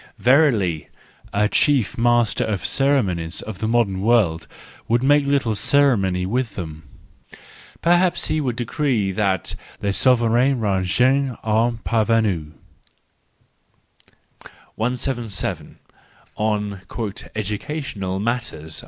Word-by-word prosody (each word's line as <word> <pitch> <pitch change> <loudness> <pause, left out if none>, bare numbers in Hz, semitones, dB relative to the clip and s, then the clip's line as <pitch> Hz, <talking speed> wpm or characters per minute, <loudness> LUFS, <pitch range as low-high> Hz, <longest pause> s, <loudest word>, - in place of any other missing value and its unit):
Verily, 120 - +2 0.4
a 105 +1 +2
chief 135 0 +2
master 120 -1 +2
of 100 -3 -3
ceremonies 95 -13 0
of 110 -4 -8
the 110 - -2
modern 110 -5 +1
world 100 -8 +2 0.4
would 120 +2 +1
make 145 +1 +3
little 140 -5 +1
ceremony 100 -7 +2
with 115 +2 -2
them; 80 -4 -6 1.0
perhaps 175 +1 +3
he 155 - -1
would 125 -5 -2
decree 120 -4 -1
that 95 -2 -1 0.3
"les 100 - -1
souverains 125 +3 +3
rangent 120 +7 +1
aux 115 +2 +1
parvenus 110 -7 +1 2.3
177 120 -2 -3 0.6
On 105 -2 -2 0.3
" 100 - -10
Educational 105 -2 -4
Matters 100 -9 -3
115 Hz, 100 wpm, -21 LUFS, 100-130 Hz, 2.3 s, make